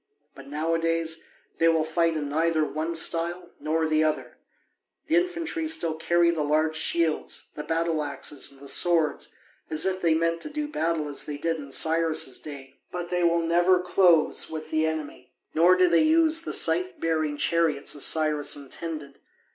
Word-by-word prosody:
But 135 Hz, 0 st, -13 dB
nowadays 165 Hz, +2 st, -1 dB, 0.3 s
they 165 Hz, -, +4 dB
will 165 Hz, -1 st, +3 dB
fight 165 Hz, +1 st, 0 dB
in 150 Hz, -1 st, -3 dB
neither 160 Hz, +1 st, +1 dB
one 160 Hz, +3 st, -3 dB
style 170 Hz, +2 st, 0 dB
nor 160 Hz, +1 st, 0 dB
the 155 Hz, 0 st, +2 dB
other. 155 Hz, -1 st, -2 dB, 0.7 s
The 320 Hz, -, +1 dB
infantry 340 Hz, -2 st, -1 dB
still 170 Hz, -, -1 dB
carry 170 Hz, +2 st, +2 dB
the 165 Hz, -2 st, -2 dB
large 155 Hz, +2 st, +1 dB
shields, 160 Hz, 0 st, -1 dB
the 150 Hz, -, -6 dB
battle 165 Hz, 0 st, -1 dB
axes, 140 Hz, 0 st, -4 dB
and 140 Hz, -, -14 dB
the 140 Hz, -, -12 dB
swords, 165 Hz, 0 st, +1 dB, 0.3 s
as 155 Hz, +1 st, +1 dB
if 190 Hz, 0 st, -1 dB
they 165 Hz, -2 st, +3 dB
meant 165 Hz, +1 st, 0 dB
to -, -, -5 dB
do 300 Hz, 0 st, -3 dB
battle 165 Hz, -, -1 dB
as 145 Hz, -, -3 dB
they 145 Hz, -1 st, -4 dB
did 165 Hz, +2 st, -1 dB
in 140 Hz, -3 st, -9 dB
Cyrus' 160 Hz, -4 st, +1 dB
day. 140 Hz, -2 st, -11 dB
But 175 Hz, -1 st, -5 dB
they 180 Hz, 0 st, 0 dB
will 170 Hz, 0 st, +2 dB
never 175 Hz, +2 st, +3 dB
close 180 Hz, -2 st, +2 dB
with 155 Hz, -1 st, -7 dB
the 155 Hz, 0 st, +1 dB
enemy. 145 Hz, -5 st, -6 dB, 0.2 s
Nor 175 Hz, +3 st, +5 dB
do 185 Hz, 0 st, +4 dB
they 170 Hz, -1 st, +4 dB
use 320 Hz, +1 st, +4 dB
the -, -, -5 dB
scythe 370 Hz, -2 st, +2 dB
bearing 155 Hz, -2 st, -1 dB
chariots 160 Hz, -3 st, 0 dB
as 145 Hz, -, -1 dB
Cyrus 155 Hz, -2 st, +1 dB
intended. 145 Hz, 0 st, -7 dB
165 Hz, 175 wpm, -26 LUFS, 155-170 Hz, 0.7 s, Nor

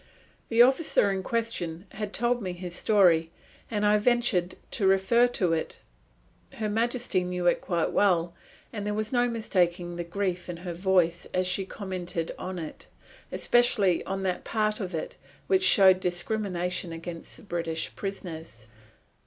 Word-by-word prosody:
The 230 Hz, +1 st, +7 dB
officer 260 Hz, -6 st, +3 dB
in 190 Hz, -1 st, -2 dB
question 190 Hz, -6 st, -2 dB
had 210 Hz, -1 st, -5 dB
told 240 Hz, +2 st, 0 dB
me 185 Hz, -3 st, -3 dB
his 175 Hz, 0 st, -7 dB
story, 175 Hz, -5 st, +3 dB, 0.4 s
and 210 Hz, -2 st, -1 dB
I 210 Hz, 0 st, +4 dB
ventured 210 Hz, -6 st, +1 dB, 0.2 s
to 195 Hz, -, +1 dB
refer 195 Hz, +6 st, +4 dB
to 185 Hz, -8 st, 0 dB
it 160 Hz, -, -3 dB, 0.8 s
Her 215 Hz, -, -3 dB
Majesty 230 Hz, -2 st, 0 dB
knew 180 Hz, 0 st, -3 dB
it 175 Hz, -, +3 dB
quite 170 Hz, -3 st, -1 dB
well, 175 Hz, -4 st, +2 dB, 0.4 s
and 210 Hz, -3 st, -4 dB
there 210 Hz, 0 st, -2 dB
was 215 Hz, 0 st, -2 dB
no 245 Hz, -1 st, +3 dB
mistaking 180 Hz, -6 st, -1 dB
the 175 Hz, -, -2 dB
grief 180 Hz, 0 st, -3 dB
in 175 Hz, -, -5 dB
her 175 Hz, -, -3 dB
Voice 175 Hz, -1 st, +1 dB
as 185 Hz, 0 st, +2 dB
she 185 Hz, +1 st, 0 dB
commented 180 Hz, -5 st, -4 dB
on 185 Hz, 0 st, -5 dB
it, 160 Hz, -3 st, -8 dB, 0.4 s
especially 215 Hz, -7 st, +3 dB
on 195 Hz, 0 st, -3 dB
that 185 Hz, -1 st, -2 dB
part 215 Hz, -1 st, -1 dB
of 185 Hz, -4 st, -4 dB
it 160 Hz, -, -5 dB, 0.3 s
which 380 Hz, -2 st, +2 dB
showed 190 Hz, -, +7 dB
discrimination 180 Hz, -1 st, -2 dB
against 165 Hz, 0 st, -7 dB
the -, -, -13 dB
British 165 Hz, -4 st, -3 dB
prisoners. 165 Hz, -, -7 dB
190 Hz, 155 wpm, -27 LUFS, 175-215 Hz, 0.8 s, The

